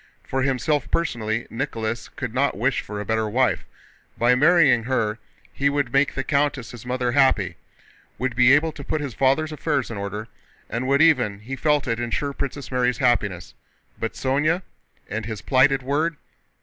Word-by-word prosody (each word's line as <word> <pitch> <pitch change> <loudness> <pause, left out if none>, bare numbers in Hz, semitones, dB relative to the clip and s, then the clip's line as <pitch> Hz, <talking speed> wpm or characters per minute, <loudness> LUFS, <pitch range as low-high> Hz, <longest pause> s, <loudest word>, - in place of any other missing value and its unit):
For 135 - -2
himself 135 +2 0
personally 115 -8 -1
Nicholas 115 -3 -3
could 125 -6 -6
not 135 -4 +1
wish 125 +6 +1
for 105 -1 -7
a 105 - -4
better 110 0 0
wife: 130 +4 +1 0.5
by 120 +1 +4
marrying 140 -4 +4
her 115 -4 0 0.3
he 140 0 +1
would 140 -4 -1
make 140 +1 +2
the 135 - -1
countess 140 -4 0
his 120 0 -11
mother 125 -1 0
happy, 135 +1 +2 0.6
would 125 +1 -2
be 125 +1 +6
able 150 +3 +4
to 145 - -10
put 155 - -2
his 140 -4 -4
father's 135 +6 +2
affairs 150 -5 -1
in 110 - -5
order, 100 +2 -5 0.4
and 120 +2 -2
would 140 +3 +4
even—he 125 -6 +2
felt 150 +1 +1
it—ensure 120 +4 -1
Princess 140 0 -5
Mary's 125 -2 +1
happiness. 100 -8 0 0.5
But 115 - -3
Sónya? 150 +7 0 0.4
And 110 +1 -4
his 110 -5 -6
plighted 135 +2 +3
word? 150 +4 0
130 Hz, 165 wpm, -23 LUFS, 115-140 Hz, 0.6 s, be